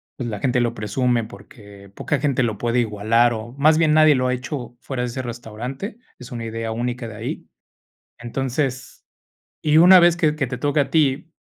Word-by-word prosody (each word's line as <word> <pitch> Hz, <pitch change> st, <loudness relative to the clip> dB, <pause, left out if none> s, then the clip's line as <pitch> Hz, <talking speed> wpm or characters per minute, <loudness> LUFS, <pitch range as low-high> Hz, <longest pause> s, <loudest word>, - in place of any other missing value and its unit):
pues 125 Hz, -3 st, -5 dB
la 105 Hz, -2 st, -5 dB
gente 125 Hz, +1 st, +1 dB
lo 120 Hz, -1 st, -1 dB
presume, 120 Hz, +3 st, 0 dB
porque 100 Hz, -1 st, -14 dB
poca 150 Hz, -, -2 dB
gente 140 Hz, -4 st, +1 dB
lo 110 Hz, -3 st, -2 dB
puede 120 Hz, +2 st, 0 dB
igualar 115 Hz, +2 st, +2 dB
o 115 Hz, +1 st, -7 dB
más 155 Hz, +2 st, +4 dB
bien 155 Hz, -2 st, +3 dB
nadie 155 Hz, -1 st, +6 dB
lo 130 Hz, 0 st, 0 dB
ha 125 Hz, -, +1 dB
hecho 125 Hz, -1 st, -7 dB
fuera 130 Hz, -3 st, -4 dB
de 125 Hz, -, -1 dB
ese 125 Hz, +2 st, -4 dB
restaurante, 120 Hz, -, -7 dB, 0.2 s
es 125 Hz, -1 st, -11 dB
una 120 Hz, -2 st, -5 dB
idea 115 Hz, 0 st, -4 dB
única 120 Hz, +1 st, -3 dB
de 110 Hz, -, -9 dB
ahí. 110 Hz, +3 st, -6 dB, 0.7 s
Entonces, 130 Hz, +2 st, -4 dB, 0.6 s
y 150 Hz, 0 st, +3 dB
una 180 Hz, +3 st, +8 dB
vez 175 Hz, 0 st, +4 dB
que 155 Hz, -4 st, +1 dB
que 150 Hz, -3 st, -2 dB
te 125 Hz, 0 st, -5 dB
toque 145 Hz, +3 st, +1 dB
a 140 Hz, -, -1 dB
ti, 150 Hz, 0 st, +1 dB
125 Hz, 200 wpm, -21 LUFS, 115-145 Hz, 0.7 s, una